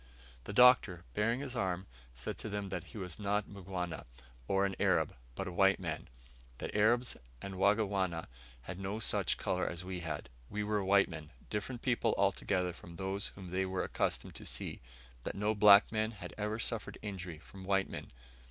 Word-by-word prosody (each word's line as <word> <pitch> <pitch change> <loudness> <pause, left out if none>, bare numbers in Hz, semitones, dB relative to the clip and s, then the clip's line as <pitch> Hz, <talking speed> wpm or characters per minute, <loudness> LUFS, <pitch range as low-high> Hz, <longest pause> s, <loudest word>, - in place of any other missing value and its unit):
The - - -4
Doctor, 105 -6 +6
baring 115 +5 +1
his 130 -3 -4
arm, 95 -5 -1 0.3
said 65 - -4
to 110 - -3
them 100 -1 -3
that 90 -2 -3
he 115 - -10
was 90 -3 -4
not 105 0 +1
a - - -18
Mgwana, 95 -3 -4 0.4
or 95 0 +3
an 95 -1 -1
Arab; - - +3 0.2
but - - -3
a - - -3
white 95 +2 +4
man; 80 -4 -4 0.5
that - - -5
Arabs 120 +4 +3 0.2
and 100 +6 -6
Wangwana 95 -3 +2 0.4
had 90 +6 -6
no 100 +2 -2
such 110 - +1
colour 90 - 0
as 85 +1 -6
we 90 -1 -3
had. 80 -6 -4 0.2
We 105 +1 -2
were 105 -1 +1
white 100 +1 +5
men, 80 -3 -8 0.2
different 110 +4 -3
people 120 -3 +2
altogether 95 -2 +1
from 85 0 -11
those 95 +2 -2
whom 95 -3 -8
they 95 +1 +1
were 95 -1 -1
accustomed - - -1
to - - -9
see: - - -2 0.4
that - - -3
no 105 +2 +1
black 105 -1 +8
men 110 0 +1
had 90 -4 -8
ever 105 +1 -1
suffered 115 -1 -3
injury 90 -5 -5
from 95 +4 -12
white 95 0 +2
men. - - -7
95 Hz, 190 wpm, -34 LUFS, 90-105 Hz, 0.5 s, black